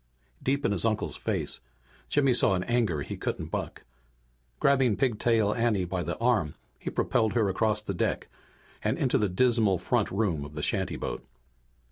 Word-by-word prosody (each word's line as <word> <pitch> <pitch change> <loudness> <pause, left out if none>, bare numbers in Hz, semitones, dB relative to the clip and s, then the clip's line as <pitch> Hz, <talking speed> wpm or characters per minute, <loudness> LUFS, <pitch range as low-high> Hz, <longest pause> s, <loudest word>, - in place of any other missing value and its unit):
Deep 140 +2 0
in - - +2
his 100 - 0
uncle's 110 -2 0
face - - -2 0.5
Jimmy 135 -3 +3
saw 100 -5 +4
an 90 - -1
anger 110 -12 0
he - - -5
couldn't - - -4
buck. - - -4 0.8
Grabbing 135 -5 +3
Pigtail 115 -3 +2
Anne 115 -6 +1
by 90 0 -2
the - - -3
arm, 115 - +1 0.2
he - - -4
propelled 110 -3 +1
her 110 -5 +2
across 105 +2 +1
the 100 - -3
deck 85 - -1 0.6
and - - +1
into 135 0 +2
the 105 -3 +1
dismal 110 -1 +3
front 110 +5 0
room 95 -8 0
of 75 +1 -10
the 75 - -4
shantyboat. 95 -5 -2
105 Hz, 165 wpm, -28 LUFS, 95-120 Hz, 0.8 s, saw